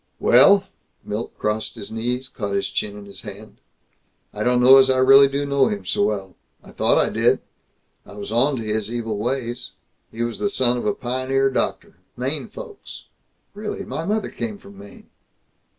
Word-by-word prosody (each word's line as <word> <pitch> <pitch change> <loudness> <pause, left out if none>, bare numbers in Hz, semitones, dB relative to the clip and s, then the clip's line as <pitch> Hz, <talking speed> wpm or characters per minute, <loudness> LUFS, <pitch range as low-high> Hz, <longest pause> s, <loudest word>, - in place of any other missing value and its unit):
"Well," 200 0 +6 0.4
Milt 105 +3 -5
crossed 105 +1 -2
his 100 - -8
knees, 120 +3 -3
caught 100 -5 -4
his 100 - -1
chin 105 -1 -3
in 100 - -10
his 100 - -10
hand, 105 +1 -11 0.8
"I - - -6
don't 125 0 +2
know 130 +2 +8
as 135 0 +5
I 130 - +3
really 135 +2 +7
do 140 +1 -2
know 140 -2 +2
him 100 -2 -4
so - - 0
well. 100 -3 -3 0.3
I - - -14
thought - - +2
I - - +2
did. - - +2 0.6
I - - -14
was 100 0 -7
onto 125 +1 +1
his 110 0 -2
evil 115 -3 -3
ways. 120 0 -3 0.4
He 115 +1 -3
was 120 -1 -4
the 205 - 0
son 125 -10 +2
of - - -4
the 105 - +1
pioneer 130 +2 0
doctor, - - -2 0.2
Maine - - -2
folks." 470 -5 -10 0.5
"Really? 205 -1 -5
My 160 - -4
mother 210 +5 -1
came 215 -3 -5
from 100 - -15
Maine." 100 0 -14
120 Hz, 180 wpm, -22 LUFS, 105-135 Hz, 0.8 s, know